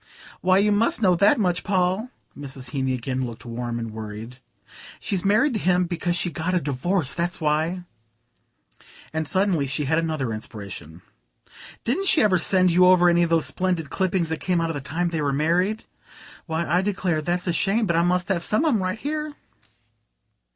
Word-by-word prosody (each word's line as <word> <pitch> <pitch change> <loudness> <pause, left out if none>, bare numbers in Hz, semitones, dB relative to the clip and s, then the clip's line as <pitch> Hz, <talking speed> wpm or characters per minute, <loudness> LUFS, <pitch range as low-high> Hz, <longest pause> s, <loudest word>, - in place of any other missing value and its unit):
"Why, 185 0 +4
you 205 +2 +3
must 220 +2 +1
know 185 -2 +5
that 200 +4 +4
much, 180 -5 0
Paul." 190 +4 0 0.3
Mrs. 135 -3 -8
Heeny 130 -2 -1
again 130 +1 -3
looked 120 -1 -7
warm 120 0 -4
and 115 -1 -5
worried. 110 +3 -8 0.6
"She's 190 -3 -2
married 215 +8 +3
to 215 - -1
him 180 -1 +2
because 175 0 -2
she 175 0 -1
got 170 +4 -2
a - - +3
divorce 145 +1 -1
that's 175 +3 -2
why." 160 +3 0 1.3
And 160 -1 -2
suddenly 185 -6 +1
she 145 +2 -2
had 160 +4 +2
another 155 -8 -2
inspiration. 95 -6 -8 0.8
"Didn't 340 +12 0
she 320 - +5
ever 190 -4 +3
send 185 +1 +3
you 180 +2 +5
over 180 -1 +6
any 175 0 +3
of 170 - +2
those 165 -1 +2
splendid 180 -5 -2
clippings 185 -3 0
that 160 - -2
came 180 -2 0
out 165 0 -1
the 145 - -5
time 170 +6 -2
they 165 -2 -2
were 145 -1 0
married? 175 +9 0 0.6
Why, 165 +1 -1
I 175 +4 +2
declare, 185 -5 -1
that's 175 +3 -2
a 175 - 0
shame; 210 +6 +1
but 170 -4 0
I 165 - +4
must 180 +1 +1
have 175 -3 0
some 215 - +1
of 310 - +3
'em 215 - +1
right 185 +2 -2
here." 300 +3 -4
175 Hz, 190 wpm, -24 LUFS, 145-185 Hz, 1.3 s, over